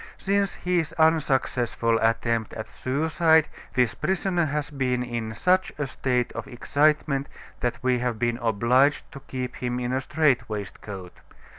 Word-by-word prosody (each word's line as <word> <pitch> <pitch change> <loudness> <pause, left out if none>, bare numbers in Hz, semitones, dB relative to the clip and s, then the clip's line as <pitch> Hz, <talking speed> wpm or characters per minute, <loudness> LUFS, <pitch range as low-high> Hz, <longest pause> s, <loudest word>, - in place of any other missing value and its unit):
Since 200 0 0
his 175 -3 -1
unsuccessful 130 -7 +2
attempt 115 0 0
at 110 - -6
suicide, 160 +3 +2 0.3
this 125 -3 +2
prisoner 190 -2 0
has 150 0 -2
been 125 -3 0
in 115 -2 -4
such 185 +7 +2
a 150 - -1
state 125 -2 -1
of - - -6
excitement 145 +2 +1 0.3
that 120 -1 -1
we 125 -1 +2
have 120 -2 -1
been 120 +1 0
obliged 120 +5 +2
to 140 - -9
keep 125 -2 -5
him 125 0 -2
in 125 0 -2
a 130 - 0
strait 135 -6 +1
waistcoat. 100 -3 -7
130 Hz, 145 wpm, -25 LUFS, 120-155 Hz, 0.3 s, unsuccessful